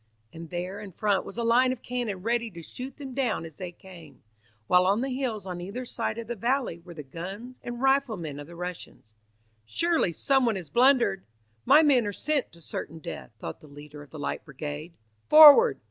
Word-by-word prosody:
And 165 Hz, 0 st, -9 dB
there 180 Hz, +3 st, -4 dB
in 205 Hz, -2 st, -9 dB
front 205 Hz, +1 st, 0 dB
was 195 Hz, -, -9 dB
a 235 Hz, -, -1 dB
line 245 Hz, +3 st, +4 dB
of 255 Hz, -, -6 dB
cannon 235 Hz, -7 st, -4 dB
ready 235 Hz, +1 st, 0 dB
to 170 Hz, -4 st, -11 dB
shoot 255 Hz, +10 st, -8 dB
them 275 Hz, -3 st, -8 dB
down 245 Hz, -9 st, -1 dB
as 160 Hz, -3 st, -12 dB
they 180 Hz, -1 st, -6 dB
came, 170 Hz, -7 st, -15 dB, 0.4 s
while 180 Hz, +8 st, +4 dB
on 200 Hz, +4 st, +2 dB
the 265 Hz, -1 st, -2 dB
hills 235 Hz, -7 st, -3 dB
on 180 Hz, -2 st, -5 dB
either 210 Hz, +8 st, -6 dB
side 230 Hz, -2 st, -3 dB
of 230 Hz, -, -5 dB
the 240 Hz, -, -4 dB
valley 235 Hz, -4 st, -1 dB
were 170 Hz, 0 st, -13 dB
the 150 Hz, -, -7 dB
guns 195 Hz, -, -8 dB
and 240 Hz, 0 st, -6 dB
riflemen 220 Hz, -, +1 dB
of 145 Hz, -, -9 dB
the 170 Hz, -, -12 dB
Russians. 180 Hz, 0 st, -7 dB, 0.6 s
"Surely 330 Hz, -, +1 dB
someone 250 Hz, -, +2 dB
has 175 Hz, -7 st, -7 dB
blundered! 240 Hz, -6 st, +3 dB, 0.4 s
My 310 Hz, +2 st, +7 dB
men 260 Hz, -7 st, +4 dB
are 205 Hz, -, -3 dB
sent 300 Hz, +4 st, -1 dB
to 170 Hz, -, -14 dB
certain 160 Hz, 0 st, -6 dB
death," 160 Hz, -, -8 dB
thought 80 Hz, -, -7 dB
the 155 Hz, -, -15 dB
leader 145 Hz, +1 st, -12 dB
of 145 Hz, -, -13 dB
the 155 Hz, -, -10 dB
Light 145 Hz, -, -4 dB
Brigade. 150 Hz, +3 st, -7 dB, 0.3 s
"Forward! 310 Hz, +10 st, +9 dB
200 Hz, 205 wpm, -27 LUFS, 170-250 Hz, 0.6 s, Forward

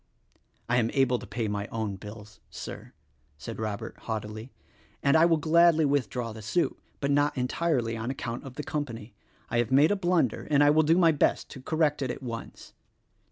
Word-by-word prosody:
"I 120 Hz, +1 st, +2 dB
am 115 Hz, -2 st, +2 dB
able 130 Hz, -3 st, +3 dB
to -, -, -10 dB
pay 110 Hz, +2 st, -2 dB
my 105 Hz, 0 st, -3 dB
own 110 Hz, -3 st, -3 dB
bills, 105 Hz, +1 st, -11 dB
Sir," -, -, -8 dB, 0.4 s
said 110 Hz, +11 st, -7 dB
Robert 105 Hz, -2 st, -4 dB
haughtily, 110 Hz, +2 st, -5 dB, 0.5 s
"and 140 Hz, +1 st, +4 dB
I 160 Hz, +1 st, +6 dB
will 165 Hz, -1 st, +3 dB
gladly 160 Hz, +1 st, +4 dB
withdraw 125 Hz, -4 st, -1 dB
the 110 Hz, -, -9 dB
suit; 170 Hz, -, 0 dB, 0.2 s
but 140 Hz, 0 st, 0 dB
not 145 Hz, 0 st, +2 dB
entirely 125 Hz, -2 st, 0 dB
on 115 Hz, +2 st, -4 dB
account 120 Hz, -2 st, -4 dB
of 135 Hz, -3 st, -10 dB
the 150 Hz, -, -4 dB
company. 130 Hz, -8 st, -5 dB, 0.4 s
I 120 Hz, -, +2 dB
have 120 Hz, 0 st, 0 dB
made 145 Hz, +6 st, +5 dB
a -, -, +3 dB
blun 175 Hz, -8 st, +2 dB
der, -, -, -9 dB
and 145 Hz, -1 st, +5 dB
I 145 Hz, -, +6 dB
will 155 Hz, +1 st, +5 dB
do 160 Hz, +2 st, +3 dB
my 170 Hz, -3 st, +5 dB
best 150 Hz, -, +1 dB
to 130 Hz, -, -9 dB
correct 155 Hz, 0 st, +1 dB
it 130 Hz, -, -1 dB
at 130 Hz, -, -5 dB
once." 115 Hz, -2 st, -7 dB
130 Hz, 200 wpm, -28 LUFS, 115-150 Hz, 0.5 s, I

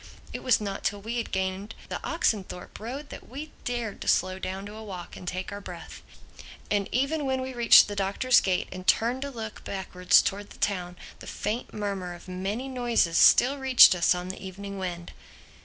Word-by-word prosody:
It -, -, -5 dB
was 255 Hz, -, +3 dB
not 200 Hz, -2 st, -5 dB
till 205 Hz, -, -1 dB
we 225 Hz, +4 st, -4 dB
had 235 Hz, -, -3 dB
gained 190 Hz, +3 st, -3 dB
the -, -, -5 dB
Oxenthorpe 190 Hz, -4 st, -2 dB
Road 270 Hz, +6 st, -6 dB
that -, -, -10 dB
we 290 Hz, +5 st, -7 dB
dared 240 Hz, -4 st, -3 dB
to -, -, -6 dB
slow 185 Hz, +1 st, +2 dB
down 190 Hz, +1 st, -5 dB
to 205 Hz, -, -9 dB
a 220 Hz, +1 st, -9 dB
walk 185 Hz, -5 st, -8 dB
and 180 Hz, -, -10 dB
take 185 Hz, +1 st, -4 dB
our 200 Hz, -, -6 dB
breath. -, -, -9 dB, 0.7 s
And 205 Hz, -1 st, +1 dB
even 275 Hz, +5 st, 0 dB
when 265 Hz, -1 st, 0 dB
we 260 Hz, 0 st, -4 dB
reached 235 Hz, -2 st, +7 dB
the 205 Hz, -, -5 dB
Doctor's 200 Hz, +6 st, +3 dB
gate 185 Hz, -2 st, 0 dB
and 185 Hz, 0 st, -8 dB
turned 240 Hz, +3 st, +2 dB
to 280 Hz, -, -3 dB
look 220 Hz, -5 st, -7 dB
backwards 180 Hz, -2 st, +2 dB
towards 205 Hz, +1 st, -3 dB
the -, -, -14 dB
town, 180 Hz, -3 st, -2 dB, 0.2 s
the -, -, -11 dB
faint 225 Hz, +4 st, -3 dB
murmur 195 Hz, -4 st, -4 dB
of 175 Hz, -, -15 dB
many 195 Hz, +8 st, -3 dB
voices 240 Hz, -9 st, +1 dB
still 275 Hz, +3 st, +6 dB
reached 265 Hz, -5 st, +8 dB
us 180 Hz, 0 st, +3 dB
on 180 Hz, +1 st, -5 dB
the 190 Hz, -, -7 dB
evening 200 Hz, +1 st, -7 dB
wind. 175 Hz, -2 st, -5 dB
205 Hz, 200 wpm, -27 LUFS, 185-240 Hz, 0.7 s, reached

